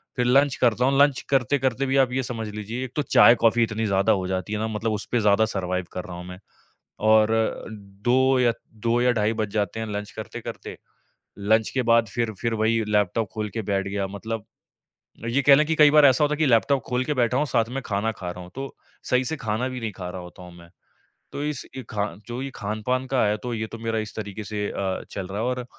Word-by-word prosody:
फिर 125 Hz, -2 st, 0 dB
लंच 135 Hz, +2 st, +4 dB
करता 120 Hz, 0 st, +2 dB
हूँ, 135 Hz, +1 st, +2 dB
लंच 145 Hz, -2 st, +4 dB
करते-करते 135 Hz, -1 st, +1 dB
भी 135 Hz, +1 st, +1 dB
आप 130 Hz, -2 st, +3 dB
ये 130 Hz, 0 st, -1 dB
समझ 115 Hz, -2 st, -4 dB
लीजिए 105 Hz, +4 st, -5 dB
एक 125 Hz, -, -9 dB
तो 150 Hz, -, +1 dB
चाय-कॉफ़ी 120 Hz, -4 st, +5 dB
इतनी 110 Hz, 0 st, -1 dB
ज़्यादा 100 Hz, -1 st, +2 dB
हो 95 Hz, -2 st, -2 dB
जाती 95 Hz, +2 st, -3 dB
है 105 Hz, -, -1 dB
ना 110 Hz, -, -1 dB
मतलब 110 Hz, +1 st, -2 dB
उसपे 110 Hz, +3 st, -1 dB
ज़्यादा 105 Hz, +1 st, +4 dB
सर्वाइव 90 Hz, -4 st, -2 dB
कर 90 Hz, -, -4 dB
रहा 90 Hz, -, -8 dB
हूँ 90 Hz, -, -8 dB
मैं। 90 Hz, 0 st, -9 dB, 0.6 s
और 110 Hz, 0 st, +4 dB, 0.8 s
2 130 Hz, +1 st, +4 dB
या 120 Hz, -2 st, +3 dB, 0.2 s
2 115 Hz, +2 st, 0 dB
या 125 Hz, 0 st, +4 dB
ढाई 110 Hz, -1 st, +1 dB
बज 110 Hz, -2 st, -2 dB
जाते 105 Hz, 0 st, -1 dB
हैं 110 Hz, -, -3 dB
लंच 105 Hz, 0 st, -5 dB
करते-करते, -, -, -8 dB, 0.6 s
लंच 110 Hz, +2 st, +2 dB
के 130 Hz, -, 0 dB
बाद 115 Hz, -1 st, +4 dB
फिर 115 Hz, +2 st, -2 dB
फिर 115 Hz, -1 st, 0 dB
वही 110 Hz, +1 st, +1 dB
लैपटॉप 105 Hz, +1 st, +1 dB
खोल 110 Hz, -1 st, -3 dB
के 110 Hz, -, -2 dB
बैठ 100 Hz, -1 st, -1 dB
गया 100 Hz, 0 st, -2 dB
मतलब 110 Hz, +2 st, -5 dB, 0.8 s
ये 125 Hz, +4 st, +1 dB
कह 140 Hz, 0 st, +7 dB
लें 150 Hz, -, +3 dB
कि 160 Hz, -, +1 dB
कई 150 Hz, -2 st, +6 dB
बार 150 Hz, -1 st, +7 dB
ऐसा 135 Hz, +2 st, +5 dB
होता 150 Hz, -, +2 dB
है 150 Hz, -, -2 dB
कि 160 Hz, -, +2 dB
लैपटॉप 130 Hz, +2 st, +3 dB
खोल 125 Hz, 0 st, 0 dB
के 150 Hz, -, 0 dB
बैठा 125 Hz, -1 st, +1 dB
हूँ, 150 Hz, -, +2 dB
साथ 115 Hz, -4 st, 0 dB
में 135 Hz, +2 st, -4 dB
खाना 105 Hz, +2 st, -1 dB
खा 90 Hz, -4 st, -7 dB
रहा 90 Hz, -, -9 dB
हूँ, 90 Hz, -, -11 dB
तो 135 Hz, 0 st, -6 dB, 0.3 s
सही 125 Hz, 0 st, +1 dB
से 160 Hz, -, -2 dB
खाना 115 Hz, +2 st, -2 dB
भी 130 Hz, -1 st, -5 dB
नहीं 110 Hz, -, -3 dB
खा 90 Hz, -2 st, -7 dB
रहा 90 Hz, 0 st, -6 dB
होता 90 Hz, +1 st, -12 dB
हूँ 90 Hz, -, -12 dB
मैं। 85 Hz, 0 st, -15 dB, 0.6 s
तो 145 Hz, -, -4 dB
इस 150 Hz, -2 st, -3 dB
ये 130 Hz, -, -5 dB
खा 105 Hz, -1 st, -1 dB, 0.2 s
जो 120 Hz, +1 st, -5 dB
ये 135 Hz, -, -4 dB
खान-पान 110 Hz, +5 st, -2 dB
का 130 Hz, -1 st, +1 dB
आया 105 Hz, 0 st, +2 dB
तो 125 Hz, -, -3 dB
ये 110 Hz, -1 st, -3 dB
तो 115 Hz, -, -9 dB
मेरा 115 Hz, -1 st, -1 dB
इस 110 Hz, -1 st, -6 dB
तरीके 105 Hz, 0 st, -6 dB
से 105 Hz, 0 st, -3 dB
अ, 95 Hz, -1 st, -3 dB
चल 95 Hz, -2 st, -5 dB
रहा 100 Hz, +2 st, -6 dB
है -, -, -1 dB
और 125 Hz, 0 st, -2 dB
115 Hz, 240 wpm, -24 LUFS, 105-130 Hz, 0.8 s, कह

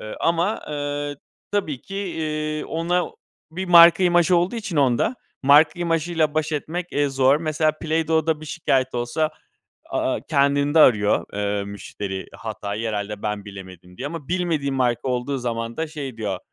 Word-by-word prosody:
Iıı, 110 Hz, -, -7 dB
ama, 170 Hz, +6 st, +1 dB
ııı, 145 Hz, 0 st, -3 dB, 0.4 s
tabii 155 Hz, -10 st, -1 dB
ki, 195 Hz, -, -8 dB
iii, 155 Hz, -5 st, -3 dB
ona 175 Hz, +2 st, 0 dB, 0.5 s
bir 180 Hz, +4 st, -4 dB
marka 170 Hz, +1 st, +8 dB
imajı 175 Hz, 0 st, +4 dB
olduğu 175 Hz, +7 st, 0 dB
için, 210 Hz, -7 st, -4 dB
onda, 135 Hz, -, +2 dB, 0.3 s
marka 150 Hz, +5 st, +5 dB
imajıyla 165 Hz, -2 st, 0 dB
baş 155 Hz, 0 st, 0 dB
etmek, 165 Hz, +4 st, -3 dB
eee, 145 Hz, 0 st, +1 dB
zor. 135 Hz, 0 st, +3 dB
Mesela 155 Hz, 0 st, +1 dB
Play-Dough'da 160 Hz, 0 st, 0 dB
bir 155 Hz, -, -9 dB
şikâyet 135 Hz, -5 st, 0 dB
olsa, 120 Hz, +6 st, -1 dB, 0.6 s
a -, -, -1 dB
aaa, -, -, -1 dB
kendinde 140 Hz, +1 st, +2 dB
arıyor, 105 Hz, -8 st, +4 dB
ııı, 100 Hz, 0 st, -1 dB
müşteri 100 Hz, -1 st, -6 dB
hatayı. 110 Hz, 0 st, -4 dB
"Herhâlde 105 Hz, -1 st, -4 dB
ben 105 Hz, -1 st, -3 dB
bilemedim." 95 Hz, -3 st, -11 dB
diye. 135 Hz, -, -5 dB
Ama 150 Hz, -2 st, -7 dB
bilmediği 170 Hz, -6 st, 0 dB
marka 125 Hz, -1 st, 0 dB
olduğu 125 Hz, +2 st, -1 dB
zaman 115 Hz, -1 st, -3 dB
da 160 Hz, -, -1 dB
şey 145 Hz, -6 st, -7 dB
diyor: 100 Hz, -4 st, -3 dB
145 Hz, 155 wpm, -23 LUFS, 120-165 Hz, 0.6 s, marka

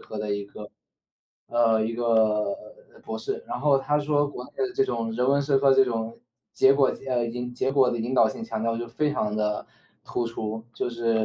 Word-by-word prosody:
科 110 Hz, -, -8 dB
的 105 Hz, -1 st, -1 dB
一 100 Hz, -, -4 dB
个 105 Hz, +1 st, -10 dB, 0.8 s
呃， 115 Hz, -2 st, +3 dB
一 115 Hz, -, -2 dB
个 110 Hz, -3 st, +2 dB, 0.6 s
博 -, -, -4 dB
士。 425 Hz, +3 st, -4 dB
然 -, -, -4 dB
后 140 Hz, -2 st, +4 dB
他 145 Hz, +2 st, 0 dB
说 145 Hz, 0 st, +1 dB
国 125 Hz, -3 st, -7 dB
内 -, -, -14 dB
的 390 Hz, -2 st, -1 dB
这 405 Hz, 0 st, +3 dB
种 115 Hz, -, -2 dB
人 125 Hz, -, +1 dB
文 140 Hz, +1 st, +4 dB
社 140 Hz, -1 st, +2 dB
科 135 Hz, 0 st, +5 dB
这 135 Hz, 0 st, +6 dB
种 115 Hz, -1 st, -3 dB, 0.3 s
结 135 Hz, -, +5 dB
果 135 Hz, -1 st, +4 dB, 0.2 s
呃， 125 Hz, -2 st, +1 dB
引 125 Hz, +1 st, -5 dB
结 130 Hz, +2 st, 0 dB
果 135 Hz, -2 st, +4 dB
的 125 Hz, -, -1 dB
引 120 Hz, +3 st, -3 dB
导 115 Hz, -4 st, +5 dB
性 225 Hz, -, -7 dB
强 225 Hz, -, -4 dB
调 115 Hz, 0 st, 0 dB
就 120 Hz, 0 st, -5 dB
非 145 Hz, +5 st, 0 dB
常 105 Hz, -7 st, -1 dB
地 105 Hz, -1 st, -1 dB, 0.4 s
突 120 Hz, -, -2 dB
出。 110 Hz, -1 st, -5 dB
就 -, -, -2 dB
是 115 Hz, -2 st, +1 dB
120 Hz, 235 characters per minute, -26 LUFS, 110-135 Hz, 0.8 s, 这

